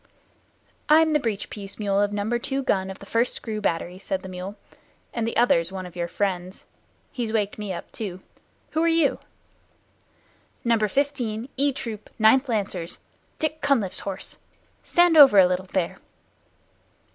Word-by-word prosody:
"I'm 315 +1 +6
the 300 - +4
breech 220 -6 -3
piece 200 -2 -8
mule 200 -2 +1
of 205 0 +1
number 210 +4 -1
two 270 +3 -2
gun 190 -5 0
of 190 - -7
the - - -12
First 230 +4 +1
Screw 215 -2 -4
Battery," 180 -1 -2
said 190 -1 -3
the 190 - -7
mule, 185 +2 -6 0.6
"and 230 -1 -1
the 230 - -2
other's 170 -8 +3
one 190 -1 -5
of 180 - -11
your 170 -1 -2
friends. 185 0 -3 0.5
He's 240 -5 -3
waked 210 -2 -1
me 210 -2 -4
up 175 - -7
too. 190 -5 -5 0.5
Who 315 - 0
are 335 - +3
you?" 330 -4 +2 1.4
"Number 230 -3 +2
Fifteen, 245 -2 -1
E 280 +2 +2
troop, 235 -7 -6
Ninth 255 +5 +5
Lancers 195 -6 -2 0.4
Dick 310 0 -2
Cunliffe's 235 -10 +1
horse. 195 -2 -5 0.4
Stand 345 -1 +4
over 275 -8 +9
a 190 - +9
little, 180 +1 -1
there." 185 -2 -2
215 Hz, 160 wpm, -25 LUFS, 190-260 Hz, 1.4 s, over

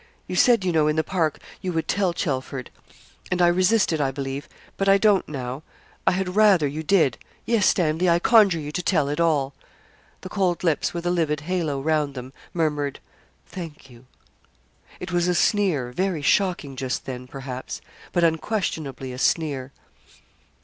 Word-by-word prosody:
You - - -5
said, 235 -7 +4
you 180 - +2
know, 155 -2 +3
in 150 - +1
the 160 - +1
park, 160 -5 0 0.2
you 185 - -2
would 160 0 -1
tell 195 -3 +1
Chelford; 135 -6 -3 0.6
and 185 - 0
I 175 - +5
resisted, 185 -2 +2
I 135 - +1
believe, 135 +1 -5 0.3
but 195 0 +1
I 195 - +7
don't 200 -2 +3
now. 130 -1 -5 0.5
I - - +5
had 185 0 -2
rather 205 -7 +5
you 145 +3 -3
did. 160 - +2 0.3
Yes, 230 -4 +3
Stanley, 170 0 +2
I 170 - +5
conjure 200 -1 +5
you 150 -1 -5
to 165 - -2
tell 155 -6 +1
it 145 - -2
all.' 145 -5 +1 0.7
The 185 - -8
cold 185 -3 0
lips, 165 -4 +1
with 170 0 -5
a 175 - +2
livid 155 -4 0
halo 160 -4 -1
round 150 -1 0
them, 130 +1 -8 0.2
murmured, 150 -4 -1 0.5
'Thank 160 -7 -9
you.' 120 +1 -17 0.9
It - - -6
was 175 0 +1
a 180 - +2
sneer, 175 - +1
very 180 +1 -1
shocking 175 -5 +1
just 130 0 -3
then, 125 -1 -6
perhaps; 130 -1 -6 0.3
but 175 - +1
unquestionably 160 - -1
a 125 - -7
sneer. 140 -4 0
160 Hz, 170 wpm, -24 LUFS, 140-180 Hz, 0.9 s, I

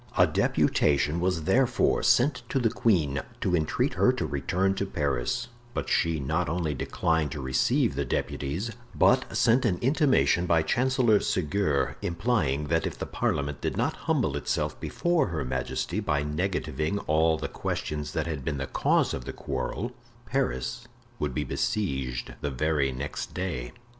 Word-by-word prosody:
A - - +7
deputation 75 +2 +2
was 90 -2 0
therefore 120 +7 +2
sent 125 +1 +3
to - - 0
the 115 -4 +2
queen 80 -11 +1 0.2
to 90 - +1
entreat 80 -2 0
her - - +4
to - - -2
return 90 +8 0
to 100 - -2
Paris; 70 - -1 0.3
but - - -2
she 80 -1 +2
not 70 +1 -1
only 80 -2 -1
declined 80 +1 0
to 75 - -5
receive 65 -1 +1
the - - -1
deputies, 80 +12 -2 0.2
but 130 0 +3
sent 120 +2 +4
an 95 -7 +1
intimation 130 - +3
by 80 -2 +3
Chancellor 125 - +3
Seguier, 75 -8 0
implying 85 - 0
that 80 0 +1
if - - -6
the - - -4
parliament 70 0 -2
did - - -2
not - - 0
humble - - +2
itself - - -2
before 175 -2 +1
her 80 -5 -3
majesty 65 +9 -2
by 75 -9 0
negativing 80 +1 -1
all 80 +1 +3
the - - -3
questions 75 -1 -4
that - - -1
had 80 -5 -4
been 70 +1 -2
the 70 - -2
cause - - +1
of 60 - -5
the - - -4
quarrel, 70 - -3 0.3
Paris 65 - -2 0.3
would 70 -4 -2
be 75 - 0
besieged 65 - -2
the 75 - -1
very 70 0 +1
next 70 +3 -5
day. 80 -11 -3
80 Hz, 160 wpm, -27 LUFS, 70-100 Hz, 0.3 s, A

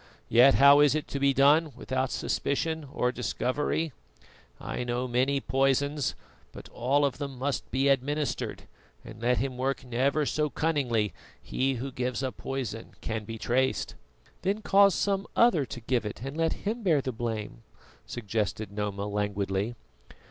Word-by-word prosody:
Yet 125 +4 +7
how 140 +1 +8
is 145 0 +5
it 155 - -2
to 140 - -3
be 140 0 +4
done 145 +3 +4
without 130 +1 -2
suspicion 160 +3 -1
or 125 -3 0
discovery? 130 +6 -1 0.7
I - - -4
know 120 +1 -2
many 130 +3 +1
poisons, 135 +1 +1 0.4
but - - -10
all 140 +4 +1
of 135 -1 -2
them 140 -3 -5
must 135 +1 -2
be 135 +3 +1
administered, 140 +2 0 0.4
and 110 0 -11
let 125 +1 +2
him 130 -1 -2
work 135 0 -1
never 135 +5 +1
so 150 +1 0
cunningly, 130 -10 0 0.3
he 135 +1 -1
who 130 +3 -4
gives 125 0 -2
a 130 - -1
poison 125 -6 -5
can 110 -1 -3
be 115 +1 -6
traced." 130 +4 0 0.5
"Then 200 +3 -1
cause 200 -1 +5
some 195 0 0
other 175 - +4
to 120 - -7
give 120 +1 0
it 105 +2 -6
and 135 +2 -5
let 165 0 +1
him 225 +4 -1
bear 165 -9 +3
the 130 - -3
blame," 115 -2 -4 0.5
suggested 105 -2 -3
Noma 100 -1 -3
languidly. 105 +1 -1
130 Hz, 155 wpm, -28 LUFS, 120-145 Hz, 0.7 s, how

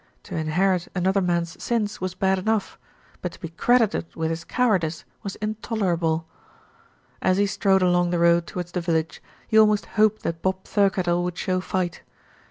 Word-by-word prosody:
To - - -7
inherit 175 +3 +1
another 190 +2 +2
man's 170 -2 -1
sins 215 -5 -1
was 185 -1 -3
bad 190 0 +1
enough; 215 +1 -1 0.4
but 180 - -4
to - - -14
be 165 - -6
credited 225 +1 +2
with 160 0 -1
his 165 +1 -4
cowardice 185 -9 0 0.2
was 200 - -5
intolerable. 190 -7 -1 1.0
As 185 0 +2
he 205 - +3
strode 195 -1 +2
along 175 -1 +3
the 175 - 0
road 170 0 +3
towards 175 -1 -5
the 180 - -2
village, 165 -2 -1 0.3
he 220 - +4
almost 215 -1 +4
hoped 215 -1 +2
that 165 0 -3
Bob 190 0 -1
Thirkettle 185 -4 +1
would 180 -1 -3
show 185 -1 -1
fight. 180 -2 -2
185 Hz, 170 wpm, -24 LUFS, 170-200 Hz, 1.0 s, he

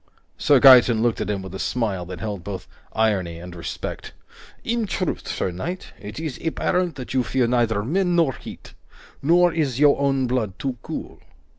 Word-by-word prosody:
Sir 145 -2 +4
Gaeton 125 -4 +7
looked 120 -2 +1
at - - -3
him 100 -2 -2
with 95 -1 -9
a 95 - -6
smile 100 -8 -2
that 90 -1 -7
held 100 -5 -4
both 95 0 -6 0.3
irony 100 -7 0
and 90 +1 -9
respect. 70 -8 -6 0.5
"In 230 -1 -1
truth, 185 -2 -3
sir 95 - -2
knight, 175 - -6
it 105 +6 -7
is 155 -5 -5
apparent 175 +1 0
that 130 -2 -7
you 130 - +3
fear 125 0 0
neither 115 -3 +1
men 175 - +1
nor 165 -6 +3
heat. - - -11 0.5
Nor 175 +3 +4
is 140 -6 -1
your 145 -1 +5
own 135 -2 +1
blood 120 -6 -1
too 130 -2 -3
cool. - - -7
125 Hz, 180 wpm, -23 LUFS, 100-155 Hz, 0.5 s, Gaeton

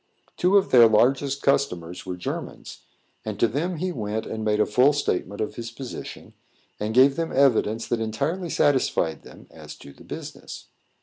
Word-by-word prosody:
Two 185 +3 +3
of 195 0 +1
their 120 -3 +8
largest 135 +5 +2
customers 90 -12 -1
were 90 -1 -4
Germans, 90 - -6 0.4
and 105 -2 -6
to 115 - +4
them 160 +10 -2
he 185 +3 -2
went 110 -6 -4
and 110 0 -5
made 105 0 +1
a - - +4
full 125 +7 +3
statement 100 -8 -2
of 110 - -4
his 115 -1 -5
position, 125 +2 -9 0.5
and 110 +2 -3
gave 135 +2 +5
them 165 -1 -2
evidence 115 -5 +2
that 120 -1 -1
entirely 145 - -2
satisfied 130 - +1
them - - -15
as - - -11
to 70 - -14
the - - -17
business. - - -9
120 Hz, 175 wpm, -24 LUFS, 105-140 Hz, 0.5 s, their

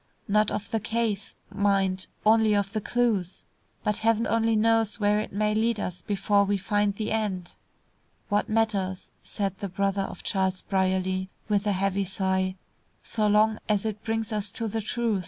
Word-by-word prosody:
Not 210 0 +3
of 205 - -4
the 225 - +1
case, 220 -2 -2 0.2
mind; 195 -2 +1 0.2
only 220 -1 +5
of 200 0 0
the 215 - -1
clues. 215 -7 0 0.4
But 210 +1 0
heaven 225 +1 +2
only 225 0 +2
knows 225 0 +2
where 210 0 +3
it 215 - -4
may 210 +2 +1
lead 225 +1 +1
us 180 -2 -4
before 200 +2 +2
we 200 0 +1
find 205 +1 0
the 215 +1 -3
end." 200 -5 -2 0.7
"What 205 0 0
matters," 205 -4 0
said 195 -2 -3
the 200 - -4
brother 195 +1 0
of - - -6
Charles 190 -1 0
Brierly, 185 -1 0 0.2
with 210 -1 +1
a 205 - +3
heavy 195 +1 0
sigh, 190 0 0 0.5
"so 215 -2 0
long 215 +1 +3
as 210 0 +1
it 215 -1 -3
brings 225 -1 -2
us 205 -1 -1
to 230 - -3
the 220 +1 -2
truth!" 225 -1 -1
205 Hz, 175 wpm, -27 LUFS, 195-220 Hz, 0.7 s, only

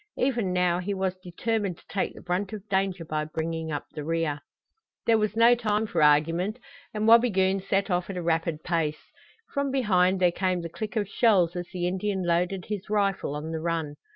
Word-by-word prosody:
Even 240 -8 0
now 180 -1 +2
he 195 +2 -2
was 190 -1 -1
determined 195 +1 -2
to - - -21
take 195 - -2
the - - -12
brunt 185 +3 -2
of 210 -1 -8
danger 190 -3 0
by 155 -1 -2
bringing 160 +1 -4
up 145 - -3
the 150 - -6
rear. 165 -2 -1 0.7
There 225 -1 +4
was 215 0 -1
no 230 +1 +6
time 220 -2 0
for 210 - -1
argument 165 +8 +3 0.3
and 215 0 -1
Wabigoon 195 -5 +5
set 195 +1 0
off 180 +1 0
at 195 - -4
a 175 - -3
rapid 165 -1 0
pace. 160 -3 -2 0.4
From 280 0 0
behind 190 -8 +2
there 180 -1 +4
came 185 0 0
the 170 - -5
click 215 +7 -6
of 210 -3 0
shells 190 -6 +3
as 175 0 -4
the 180 -2 -2
Indian 190 +1 -1
loaded 175 +2 0
his 210 -1 -5
rifle 200 -7 0
on 155 +2 -5
the 160 - -3
run. 165 -3 -2
185 Hz, 200 wpm, -27 LUFS, 165-210 Hz, 0.7 s, no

